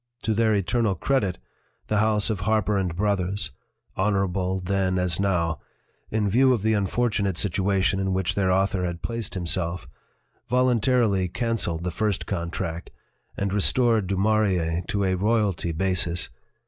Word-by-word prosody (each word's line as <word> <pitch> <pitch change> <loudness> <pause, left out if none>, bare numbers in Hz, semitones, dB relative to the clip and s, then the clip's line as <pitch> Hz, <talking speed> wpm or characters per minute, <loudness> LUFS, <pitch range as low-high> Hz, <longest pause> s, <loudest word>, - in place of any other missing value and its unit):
To 110 - +1
their 110 0 +2
eternal 100 +2 +1
credit, 100 -5 0 0.5
the 105 - 0
house 110 0 +2
of 105 - -2
Harper 105 0 +1
& - - -10
Brothers 100 0 0 0.4
honorable 95 -2 0
then 95 0 0
as 90 -2 0
now 85 -5 0 0.5
in 110 -1 0
view 130 +6 +4
of 110 -5 -2
the 110 0 +2
unfortu 105 +2 0
nate 95 -3 -1
situation 95 0 +1
in 95 0 -1
which 95 -1 0
their 95 -2 +1
author 95 0 +1
had 85 -1 -4
placed 115 -4 -4
himself, 90 -1 -2 0.6
voluntarily 120 -5 +2
canceled 90 -5 -2
the 90 - -2
first 105 +2 -1
contract 85 -2 -4 0.5
and 100 0 -1
restored 115 0 +2
Du 95 0 -1
Maurier 95 -5 +1
to 100 -1 -1
a 95 -1 +1
royalty 100 -3 0
basis. 85 -1 0
95 Hz, 150 wpm, -25 LUFS, 90-110 Hz, 0.6 s, view